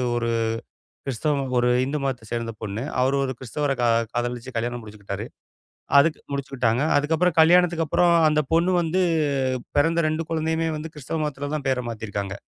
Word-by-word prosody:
ஒரு 115 -1 -1 0.8
கிறிஸ்தவம் 135 0 -1
ஒரு 120 0 +3 0.2
இந்து 145 +3 -2
மதத்தை 130 -4 -3
சேர்ந்த 115 -1 -2
பொண்ணு. 110 +2 -4 0.2
அவரு 130 +2 +2
ஒரு 130 - -2
கிறிஸ்தவர 140 +3 -2
கா 120 - +3 0.3
காதலிச்சு 120 +1 -3
கல்யாணம் 120 +1 -2
முடிச்சுக்கிட்டாரு. 105 -2 -7 0.7
அதுக்கு 155 +2 +3
முடிச்சுக்கிட்டாங்க. 130 -3 0
அதுக்கப்புறம், 160 +4 +1
கல்யாணத்துக்கு 170 0 +4
அப்புறம் 170 +3 +3
அந்தப் 150 -2 0
பொண்ணு 170 +3 +3
வந்து 180 +3 +1 0.7
பிறந்த 165 +3 +3
2 155 +1 -2
குழந்தையுயே 160 0 0
வந்து 160 +1 -7
கிறிஸ்துவ 150 +2 -4
மதத்துல 145 -1 -4
தான் 140 -2 -6
பேர 130 -1 +1
மாத்தி 110 -1 -6
இருக்காங்க. 100 -1 -4
140 Hz, 155 wpm, -24 LUFS, 120-160 Hz, 0.8 s, கல்யாணத்துக்கு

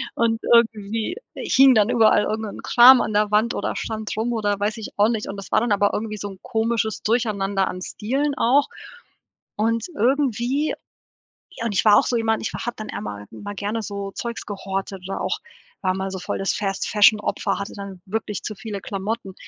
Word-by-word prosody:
Und 225 -1 +1
irgendwie, 225 - +2 0.2
äh, - - -6
hing 270 0 +7
dann 215 0 +4
überall 220 -3 +4
irgend 220 +1 -2
'n 205 - -8
Kram 250 +1 +8
an - - -2
der 210 0 +2
Wand 215 +3 +2
oder - - -2
stand 220 -1 -4
rum 230 +2 0
oder 205 -3 0
weiß 210 +2 -1
ich 220 - -7
auch 205 +2 +4
nicht 220 -3 -2
und 195 - -5
das 195 - -9
war - - +4
dann 235 -1 -1
aber 205 0 +2
irgendwie 215 0 -3
so 205 0 -5
'n 190 -1 -12
komisches 225 -1 -1
Durcheinander 200 -4 0
an 185 - -5
Stielen 270 +10 -2
auch, 275 +5 +3 0.9
und 225 +2 0
irgendwie 265 +2 +1 0.8
ja, 230 - -3
und 225 - -1
ich - - +2
war 210 - +8
auch - - +4
so 245 - 0
jemand, 225 -1 0
ich - - -3
hatte 240 0 -4
dann - - -9
immer 105 -1 -6
mal 205 - -8
gerne 205 +3 -3
so 200 -1 -5
Zeugs 235 +2 -5
gehortet 195 -1 -5
oder 195 - -4
auch - - -1 0.4
war 185 -1 0
mal 190 0 -3
so 190 - -5 0.2
das 195 - 0
Fast-Fashion-Opfer, 210 +1 +2
hatte 200 - -5
dann 200 -2 -8
wirklich 210 0 -4
zu 215 - -5
viele 200 0 -6
Klamotten. 200 0 -4
215 Hz, 195 wpm, -22 LUFS, 200-230 Hz, 0.9 s, Kram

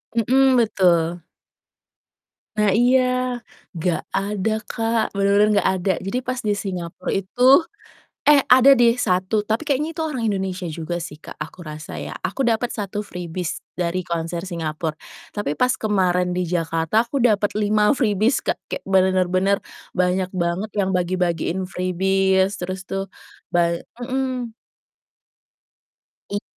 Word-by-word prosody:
Mhm, 260 +3 +4
betul. 175 -7 +2 1.4
Nah, 210 -1 +3
iya. 245 +5 +4 0.7
Nggak 170 +1 0
ada, 205 +1 -1
Kak, 225 0 0
bener-bener 200 +1 +3
nggak - - +2
ada, 190 - +2
jadi 195 +7 -2
pas 255 0 -3
di 210 -3 0
Singapura 180 -4 -5
itu 195 +5 -3 0.9
eh, 290 -2 +6
ada 260 +2 +7
deh 235 -1 +5
1, 185 0 +1
tapi 220 +6 0
kayaknya 295 +1 0
itu 320 - -3
orang 295 -6 -3
Indonesia 190 -2 -2
juga 165 +2 -4
sih, 150 -2 -7
Kak, - - -10
aku 160 +4 -7
rasa 155 0 -8
ya, - - -5
aku 185 +8 -2
dapet 235 +1 +1
1 205 -2 -4
freebies 180 -3 -5 0.2
dari 180 0 -2
konser 170 +1 -3
Singapura, 160 -3 -3 0.4
tapi 180 -8 -3
pas 250 0 +3
kemarin 180 -4 +1
di 180 - 0
Jakarta 165 +3 +1
aku 280 - -2
dapet 210 -4 +3
5 210 0 +3
freebies, 215 0 +1
Kak, - - -1
kayak - - -4
benar-benar 185 0 +2 0.4
banyak 180 +1 +1
banget 185 +3 -2
yang 195 -2 +1
bagi-bagiin 180 0 0
freebies, 190 +1 +1
terus 185 +1 -5
tuh 195 +1 -4 0.4
ba 170 -1 +1 0.2
mhm. 255 -1 -3 1.8
Iya 205 - -2
190 Hz, 135 wpm, -22 LUFS, 180-220 Hz, 1.8 s, ada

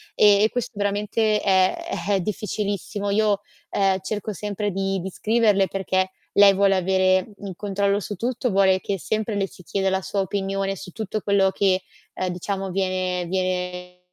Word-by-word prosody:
e 210 +1 +5
questo 245 0 -3
veramente 210 +1 +1
è 190 -2 +3 0.3
è 200 -1 +3
difficilissimo. 205 0 -3
Io, 205 -1 +2 0.3
ehm, 195 -1 +2
cerco 210 +2 -4
sempre 205 +1 -3
di 195 0 -1
di 190 - -4
scriverle, 215 -2 +2
perché 190 -1 0 0.3
lei 200 -1 +8
vuole 195 0 +4
avere 185 +1 +2
il 195 -2 -5
controllo 200 0 0
su 205 +1 -5
tutto, 245 +4 -1
vuole 190 -1 +4
che 195 +1 -3
sempre 215 +3 -2
le 195 -1 0
si 180 - -15
chieda 195 +2 0
la 190 - 0
sua 195 +1 -2
opinione 195 0 -2
su 180 +4 -9
tutto 215 +1 -4
quello 195 -1 +3
che, 190 -1 +2 0.3
uhm, 185 - -2
diciamo 190 +2 -3
viene 185 -1 -1
viene 180 -1 -3
195 Hz, 160 wpm, -23 LUFS, 185-205 Hz, 0.3 s, lei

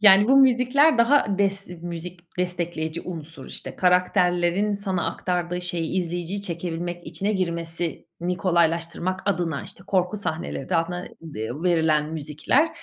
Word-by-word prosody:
Yani 205 +1 +8
bu 270 - +6
müzikler 265 +2 +5
daha 235 -5 +4
des 195 0 +1
iii, 180 - -8
müzik 175 +1 -7 0.2
destekleyici 170 -2 -2
unsur. 160 -5 -7
İşte, - - -6
karakterlerin 180 +1 +2
sana 195 -3 -1
aktardığı 180 -1 -2
şeyi 175 -1 -2
izleyiciyi 175 +2 -2
çekebilmek 175 -1 -4
içine 185 +6 -1
girmesini 170 -1 -2
kolaylaştırmak 170 +1 +1
adına, 175 -6 0
işte, - - -11
korku 185 +1 +1
sahneleri 170 -4 -2
altına, 170 +2 0 0.2
ııı, 145 -1 -5
verilen 160 -3 +2
müzikler. 155 - +1
175 Hz, 125 wpm, -24 LUFS, 165-190 Hz, 0.2 s, Yani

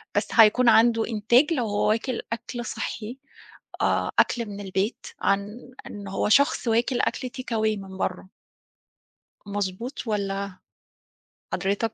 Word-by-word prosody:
بس - - +1
هيكون 230 +2 +6
عنده 230 0 +4
إنتاج، 240 +8 +3
لو 250 -7 0
هو 205 0 0
واكل 230 +3 0
أكل 240 +1 -6
صحّي، 230 +2 -5 0.7
آآ، - - +1
أكل 235 -2 +1
من 205 -1 -7
البيت، 195 +3 -2
عن 205 +5 -1 0.2
إنه 200 -1 -8
هو - - 0
شخص 280 0 +3
واكل 235 +2 +1
أكل 255 - -1
takeaway 220 -4 -1
من 190 -1 -9
برَّه. 185 0 -3 1.2
مضبوط 205 +6 -4
والّا؟ 200 -2 -2 0.9
حضرتك 200 +4 -1
220 Hz, 125 wpm, -25 LUFS, 200-240 Hz, 1.2 s, هيكون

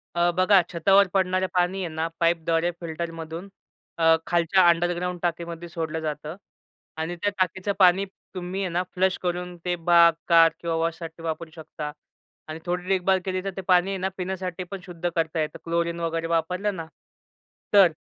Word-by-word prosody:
अ, 175 0 +3
बघा 185 +1 +6
छतावर 195 +3 +4
पडणारे 185 -1 +2
पाणी 185 +1 +1
आहे - - -2
ना, 160 +1 0
पाईपद्वारे 165 0 +2
फिल्टरमधून 165 +1 -6 0.5
अ, 165 0 +5
खालच्या 175 +2 +4
अंडरग्राउंड 175 +1 0
टाकीमध्ये 170 0 -3
सोडलं 160 -1 -3
जातं 155 0 -4 0.6
आणि 165 +2 -3
त्या 205 +4 0
टाकीचं 185 +2 0
पाणी 185 +1 +5 0.3
तुम्ही 185 +2 -4
आहे 190 - -1
ना 175 +2 0
फ्लश 185 0 +2
करून 180 0 -2
ते 180 - +1
बाग, 170 0 +5
कार 165 -1 +7
किंवा 170 -1 -2
वॉशसाठी 165 0 -3
वापरू 165 0 -4
शकता 155 -2 -7 0.6
आणि 155 +1 -6
थोडी 180 +1 -2
देखभाल 190 0 +2
केली, 185 -1 -2
तर 195 - -2
ते - - -2
पाणी 180 0 +4
आहे 195 - -2
ना, 190 +1 -1
पिण्यासाठी 185 -1 -4
पण 195 - -5
शुद्ध 175 -1 -3
करता 165 0 0
येतं. 155 - -3
क्लोरीन 170 0 -1
वगैरे 165 0 -2
वापरलं 180 +5 0
ना 165 -3 -5 0.9
तर. 195 -4 +7
175 Hz, 165 wpm, -25 LUFS, 165-185 Hz, 0.9 s, कार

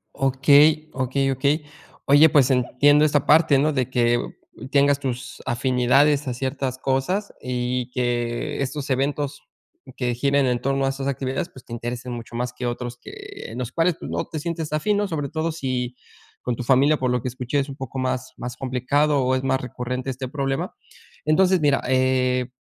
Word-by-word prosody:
Okey, 145 +3 +4
okey, 135 +1 0
okey. 145 +3 0 0.4
Oye, 145 +3 +7
pues, 140 -3 +4
entiendo 145 +4 +4
esa 145 -2 +2
parte, 155 -2 +5
¿no?, 150 +3 +2
de 130 -2 -1
que 120 -1 +3 0.5
tengas 140 0 +4
tus 130 -2 -5
afinidades 130 +4 +2
a 125 - -1
ciertas 130 +1 -3
cosas 135 +11 -1
y 125 0 -2
que 120 0 -2
estos 140 +1 -3
eventos 140 +2 -1 0.5
que 125 -2 -1
giren 140 +2 +2
en 125 -1 +1
torno 135 0 0
a - - +2
esas 135 0 -4
actividades, 135 +5 -2
pues, 130 - -15
te 120 - -10
interesen 120 +1 -5
mucho 115 0 -7
más 125 +1 -2
que 125 0 -5
otros 120 0 -4
que - - -11 0.4
en 120 - -6
los 125 -1 -4
cuales 165 +2 +1
tú - - -7
no - - -2
te 155 - -6
sientes 160 -1 -4
afin, 205 +7 +1
¿no? 205 - 0
Sobre 150 -6 -3
todo 160 +1 -2
si 130 -5 -3 0.5
con 125 - -2
tu 125 - -5
familia, 140 +4 +4
por 130 -1 0
lo 125 - 0
que 130 - -4
escuché, 130 +3 -2
es 140 +1 -2
un 135 - -7
poco 135 -1 -6
más 130 0 -2
más 125 0 -6
complicado 135 +2 +1
o 130 +1 +2
es 130 - -2
más 135 0 +1
recurrente 125 +1 -4
este 130 0 -4
problema, 135 0 -2 0.5
entonces, 185 +4 +4
mira, 145 -2 +3
eh, 130 -1 +2
135 Hz, 185 wpm, -23 LUFS, 125-145 Hz, 0.5 s, Oye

